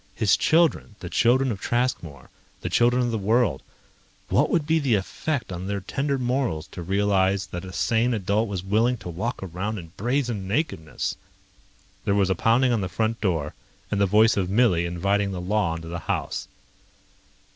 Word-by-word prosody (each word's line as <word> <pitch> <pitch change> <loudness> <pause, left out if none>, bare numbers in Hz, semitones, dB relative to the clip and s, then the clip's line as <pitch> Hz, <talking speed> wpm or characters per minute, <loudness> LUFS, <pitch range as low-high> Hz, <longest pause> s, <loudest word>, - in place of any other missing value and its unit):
His - - +3
children, 160 -9 +2
the 90 - -7
children 130 +2 +3
of 100 - -5
Traskmore, 90 - -2 0.3
the - - -4
children 120 +1 +3
of 120 - 0
the 110 - -1
world... 105 - +2 0.7
what - - +3
would 165 -4 +1
be 160 +1 +2
the 135 -7 +2
effect 125 +6 -3
on 90 +1 -5
their 100 0 -2
tender 140 +8 -2
morals 125 - -1
to 90 - -7
realize 100 +1 +1
that 85 +1 -7
a 95 - -8
sane 115 +6 +1
adult 105 +2 0
was 95 -3 -4
willing 110 +6 +2
to 95 -3 -8
walk 100 +7 -3
around 95 +5 -4
in 85 -4 -9
brazen 120 -4 -1
nakedness? 100 - -2 0.9
There 100 - +1
was 95 -2 +2
a - - +2
pounding 120 +7 +3
on 115 - +1
the 95 - -3
front 110 +6 -1
door, 80 -8 -1 0.4
and 100 -1 +1
the 100 - +4
voice 110 +3 +5
of 95 -2 0
Millie 95 -6 +3
inviting 100 +3 0
the 90 - -4
law 95 -2 0
into 80 0 -7
the 85 +1 -4
house. - - -3
100 Hz, 180 wpm, -25 LUFS, 90-120 Hz, 0.9 s, voice